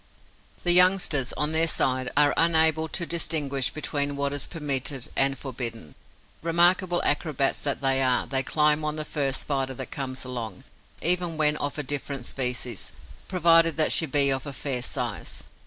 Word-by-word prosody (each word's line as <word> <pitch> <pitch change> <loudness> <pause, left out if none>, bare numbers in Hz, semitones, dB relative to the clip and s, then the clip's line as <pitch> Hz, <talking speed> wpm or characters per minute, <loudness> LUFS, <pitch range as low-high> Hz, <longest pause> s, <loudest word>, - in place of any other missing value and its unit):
The 175 - +2
youngsters, 180 -7 +4
on 150 +1 -1
their 160 +1 +3
side, 130 -4 0
are 145 0 +5
unable 160 -1 +3
to 170 +3 -3
distinguish 145 -7 -1
between 145 -1 -2
what 140 0 -2
is 145 - -3
permitted 140 -5 -2
and 135 0 +2
forbidden. 115 - -6 0.5
Remarkable 175 +2 +2
acrobats 145 -3 0
that 140 -1 0
they 135 -1 +2
are, 130 -1 +2
they 135 -1 +2
climb 150 +2 +1
on 150 0 -2
the 155 -1 -5
first 140 -4 -1
Spider 135 -2 -2
that 130 0 -7
comes 130 -1 -4
along, 115 -7 -6 0.4
even 175 -1 +1
when 150 -1 +2
of 145 0 -4
a 150 - -2
different 140 -2 -4
species, 125 -4 -3 0.4
provided 165 -3 +4
that 155 - +2
she 160 - +3
be 140 0 +2
of 135 +2 -2
a 140 - -6
fair 130 -2 -3
size. - - -5
145 Hz, 165 wpm, -25 LUFS, 135-160 Hz, 0.5 s, are